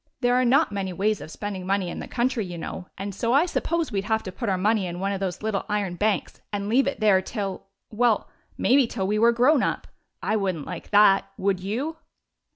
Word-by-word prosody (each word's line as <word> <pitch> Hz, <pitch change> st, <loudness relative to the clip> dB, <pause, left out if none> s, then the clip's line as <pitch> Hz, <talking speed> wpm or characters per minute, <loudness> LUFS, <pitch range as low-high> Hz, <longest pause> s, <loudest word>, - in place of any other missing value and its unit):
There 245 Hz, -1 st, +3 dB
are 250 Hz, +1 st, +3 dB
not 270 Hz, +4 st, +3 dB
many 195 Hz, -2 st, -3 dB
ways 205 Hz, +3 st, 0 dB
of -, -, -8 dB
spending 195 Hz, +1 st, -5 dB
money 195 Hz, -1 st, +1 dB
in -, -, -6 dB
the -, -, -6 dB
country, 240 Hz, -2 st, 0 dB
you 175 Hz, -2 st, -7 dB
know, 180 Hz, +2 st, -6 dB
and 200 Hz, +1 st, -5 dB
so 230 Hz, +5 st, 0 dB
I 285 Hz, +5 st, +5 dB
suppose 335 Hz, -3 st, -1 dB
we 200 Hz, -2 st, 0 dB
'd -, -, -12 dB
have 220 Hz, 0 st, 0 dB
to 185 Hz, -, -6 dB
put 230 Hz, +3 st, -3 dB
our 190 Hz, -, +1 dB
money 205 Hz, 0 st, +1 dB
in 175 Hz, 0 st, -5 dB
one 195 Hz, +1 st, -1 dB
of 195 Hz, -, -2 dB
those 190 Hz, 0 st, -3 dB
little 215 Hz, -2 st, -1 dB
iron 205 Hz, -4 st, -1 dB
hanks 210 Hz, -3 st, 0 dB
and 200 Hz, -1 st, -3 dB
leave 260 Hz, +5 st, +3 dB
it 275 Hz, -, -2 dB
there 205 Hz, -3 st, +4 dB
till 195 Hz, -1 st, -5 dB
— -, -, -56 dB
well, 230 Hz, 0 st, +2 dB, 0.3 s
maybe 265 Hz, -1 st, +4 dB
till 195 Hz, -5 st, -3 dB
we 210 Hz, +2 st, 0 dB
were 230 Hz, +1 st, +6 dB
grown 250 Hz, +5 st, +4 dB
up. -, -, -1 dB, 0.4 s
I 215 Hz, -, +1 dB
would 195 Hz, -3 st, 0 dB
n't 150 Hz, -, -7 dB
like -, -, -7 dB
that. 205 Hz, -1 st, +5 dB
Would 190 Hz, -1 st, 0 dB
you 245 Hz, -, -3 dB
210 Hz, 245 wpm, -25 LUFS, 195-240 Hz, 0.4 s, were